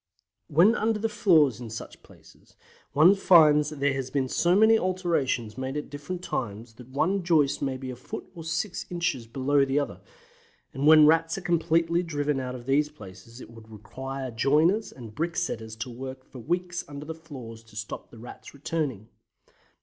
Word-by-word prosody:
When 175 +9 +5
under 225 -2 0
the 220 +2 -1
floors 160 - +3
in 115 - -7
such 110 - -9
places - - -20 0.4
one 155 +7 +7
finds 155 -6 +5
there 145 -2 0
has 135 -1 -4
been 135 -1 -1
so 175 +7 +2
many 220 +2 +6
alterations 165 - -1
made 130 +2 -3
at 150 - -6
different 160 +5 -6
times 110 - -4
that 125 - -12
one 160 +9 0
joist 155 -5 +2
may 135 -2 -2
be 130 0 -6
a - - -7
foot 125 - -8
or 170 -3 -9
six 170 +4 -3
inches 165 -9 -2
below 140 +3 +1
the 135 +1 0
other, 145 - -2 0.7
and 140 +2 -1
when 155 0 +8
the - - +8
Rats 165 +2 +3
are - - -5
completely 170 0 +1
driven 145 -4 -2
out 125 -1 -4
of 120 -1 -10
these 145 +3 +2
places 110 -2 -13
it - - -12
would 115 -1 -14
require 130 +5 -7
joiners 155 - +2
and 115 -5 -11
bricksetters 155 -8 -3
to 125 - -4
work 130 +2 -8
for 130 - -12
weeks 175 +6 -2
under 145 0 -8
the 160 - -5
floors 130 -9 -10
to 110 -1 -19
stop 105 0 -7
the 115 - -15
Rats 120 +4 -11
returning. 140 -7 -3
145 Hz, 185 wpm, -26 LUFS, 125-170 Hz, 0.7 s, when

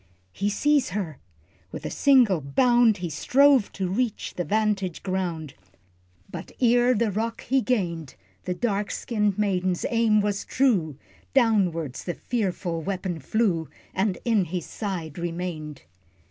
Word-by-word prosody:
He 200 - -1
sees 290 +7 +2
her! 160 -9 -4 0.5
With - - -7
a - - -3
single 245 - +4
bound 240 - +3
He 175 -2 -4
strove 275 - +4
to 190 -1 -2
reach 220 +4 -2
the 175 - -2
vantage 200 -3 0
ground, 175 -6 -3 0.7
But - - -8
ere 245 0 +4
the 225 -1 +1
rock 225 +3 -2
he 265 +1 +2
gained, 170 - -2 0.3
The 180 - -2
dark 205 -2 -1
skinned 210 -4 -1
maiden's 185 -3 0
aim 230 -2 +3
was 205 -1 -1
true, 190 - +1 0.4
Downwards 185 - +2
the 175 - -3
fearful 185 -7 -2
weapon 185 -1 -3
flew, 170 - 0 0.2
And 190 -1 0
in 220 -6 +3
his 175 0 -4
side 175 -7 -5
remained! 170 - -5
200 Hz, 135 wpm, -25 LUFS, 175-230 Hz, 0.7 s, single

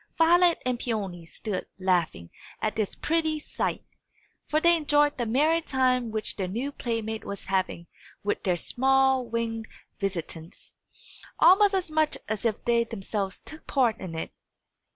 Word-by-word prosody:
Violet 345 +1 +5
and 250 -1 0
Peony 195 -9 -3
stood 200 +2 -5
laughing 175 - 0 0.3
at 215 - -1
this 215 -3 -1
pretty 320 -1 0
sight: 300 - -3 0.6
for 305 - +2
they 340 +1 +5
enjoyed 295 -2 +3
the 240 - 0
merry 305 +8 +3
time 255 -4 +1
which 215 0 -3
their 190 -3 -2
new 240 +10 -3
playmate 225 -4 -3
was 200 -1 -7
having 185 -3 -1 0.4
with 205 - -1
their 180 -2 +1
small 265 +5 +2
winged 230 -1 -3 0.3
visitants, 170 -3 -5 0.6
almost 395 +2 +6
as 365 -4 -1
much 310 -1 +1
as 215 +1 -3
if 220 -2 -1
they 235 -1 +3
themselves 200 -3 -4
took 310 - -12
part 245 -5 +2
in 180 -4 -6
it. 160 - -4
230 Hz, 150 wpm, -27 LUFS, 200-295 Hz, 0.6 s, almost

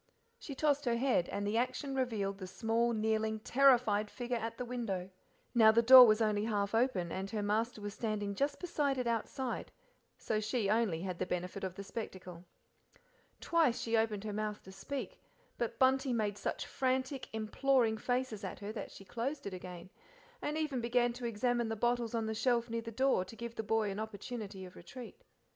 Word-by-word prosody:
She 280 - -7
tossed 290 0 +1
her 235 -1 +2
head, 245 -8 +1
and 205 - -3
the 210 +2 0
action 255 +3 -2
revealed 215 -7 -1
the 185 - -6
small, 225 +4 0
kneeling, 220 0 0
terrified 240 -6 +4
figure 245 -1 -3
at 230 0 -4
the 250 - -3
window. 205 -7 -3 0.4
Now 220 -3 +7
the 230 +1 +3
door 255 +1 +11
was 215 +1 +4
only 210 -1 +1
half 205 -2 -1
open, 225 -8 +1
and 190 +1 -4
her 210 0 -2
master 220 +2 0
was 205 0 -5
standing 210 -3 -2
just 280 +7 -1
beside 295 -6 0
it 250 - -1
outside, 235 +2 -2 0.5
so 215 - -1
she 215 -1 0
only 210 -7 +1
had 185 -2 -4
the 185 - -1
benefit 180 +2 -3
of 185 -2 -3
the 200 - -6
spectacle. 185 -4 -7 1.0
Twice 320 -8 +2
she 230 0 0
opened 220 -2 +1
her 210 -1 -4
mouth 210 0 -3
to 190 - -11
speak, 260 +9 -6 0.4
but 230 -1 -2
Bunty 265 0 +3
made 210 -3 0
such 205 - -3
frantic, 260 +1 -1
imploring 220 +1 +1
faces 245 -3 -1
at 190 - -5
her 205 +1 -6
than 220 - -6
she 195 - -13
closed 265 +8 -4
it 200 - -4
again, 180 0 -8 0.5
and 300 +1 -2
even 295 -6 -1
began 240 0 +2
to 245 0 -6
examine 235 +1 0
the 225 - -1
bottles 240 +1 0
on 225 -1 0
the 220 - -2
shelf 235 +1 +1
near 230 0 -1
the 230 0 -7
door 260 -4 +2
to 190 +5 -11
give 235 0 -6
the 225 - -3
boy 220 -1 0
an 195 - -5
opportunity 215 -2 -6
of 180 - -13
retreat. 245 +7 -10
225 Hz, 195 wpm, -33 LUFS, 205-245 Hz, 1.0 s, door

